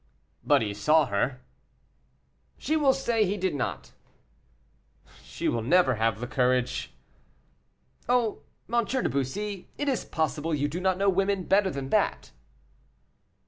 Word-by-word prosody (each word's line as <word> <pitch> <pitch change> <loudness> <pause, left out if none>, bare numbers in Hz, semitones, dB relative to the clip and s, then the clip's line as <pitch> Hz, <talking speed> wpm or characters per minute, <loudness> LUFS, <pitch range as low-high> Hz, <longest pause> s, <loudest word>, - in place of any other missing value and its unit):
"But - - +3
he 105 -2 -3
saw 150 +10 +3
her." 125 +3 -1 1.2
"She 310 - -1
will 290 -3 +4
say 235 -5 +1
he 200 +1 -1
did 185 -3 -1
not." 135 -4 -4 1.3
"She - - -4
will 115 - 0
never 145 +3 +3
have 110 -1 0
the 120 - -4
courage." 125 0 0 1.2
"Oh, 240 -7 +1 0.3
M. 235 +1 +1
de 255 +4 -1
Bussy, 190 +9 -3
is 280 -3 -1
it - - -23
possible 155 0 -1
you 145 0 0
do 160 +5 -4
not 185 0 +1
know 200 +1 +1
women 195 0 +1
better 195 +2 +3
than 135 -4 -5
that!" - - 0
175 Hz, 140 wpm, -27 LUFS, 130-205 Hz, 1.3 s, will